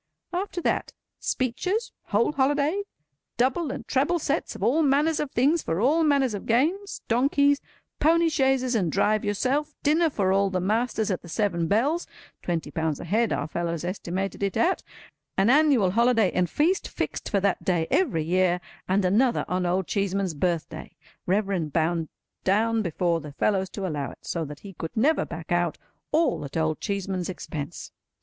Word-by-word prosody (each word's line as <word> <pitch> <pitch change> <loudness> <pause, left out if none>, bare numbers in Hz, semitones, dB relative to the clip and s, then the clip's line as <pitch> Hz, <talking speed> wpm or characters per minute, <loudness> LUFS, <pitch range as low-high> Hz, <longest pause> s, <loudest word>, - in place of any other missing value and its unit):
After 365 0 -2
that, - - -1 0.3
speeches, 365 - -1
whole 215 +6 +2
holiday, 290 +6 +1 0.6
double 265 +6 +1
and - - -5
treble 290 +7 +2
sets 300 -1 -2
of - - -6
all 295 +7 +3
manners 295 +2 +2
of 295 - -2
things 285 +7 +2
for 165 +2 -2
all 295 +9 +3
manners 280 -6 +2
of 200 - -6
games, 330 - 0
donkeys, 280 +4 +3 0.4
pony 330 +2 +4
chaises 265 -4 +2
and 185 -8 +1
drive 215 +5 +2
yourself, 260 +8 0
dinner 315 +3 +3
for 195 -8 +1
all 195 0 +3
the 185 -1 -1
masters 220 +2 0
at 185 - -2
the 170 - -12
Seven 170 -4 0
Bells 280 - +1 0.3
(twenty 165 -4 -3
pounds 160 -2 -1
a - - -6
head 220 +6 +1
our 145 - -1
fellows 170 0 -3
estimated 185 +2 -3
it 200 -1 -1
at), 370 +3 +2 0.6
an 195 +5 +4
annual 275 -10 +4
holiday 230 -2 +3
and 180 -1 +1
feast 345 - +1
fixed - - -4
for 200 - +2
that 195 -1 0
day 175 -3 +1
every 170 - +2
year, 180 +2 +2 0.3
and 190 +1 +2
another 235 +7 +2
on 180 0 0
Old 185 +1 +1
Cheeseman's 195 -2 -1
birthday—Reverend 170 +2 -2
bound 165 0 0 0.3
down 225 +4 +2
before 170 -2 0
the 150 -1 -9
fellows 190 +4 +1
to 195 0 -5
allow 145 -6 -2
it, - - -15
so 165 -2 -2
that 145 0 -9
he 200 -1 -10
could 165 +3 -7
never 290 +8 +3
back 165 -1 -8
out—all 175 - -1
at 140 +2 -5
Old 155 -1 0
Cheeseman's 195 -3 -2
expense. 160 -3 -6
205 Hz, 170 wpm, -26 LUFS, 175-275 Hz, 0.6 s, pony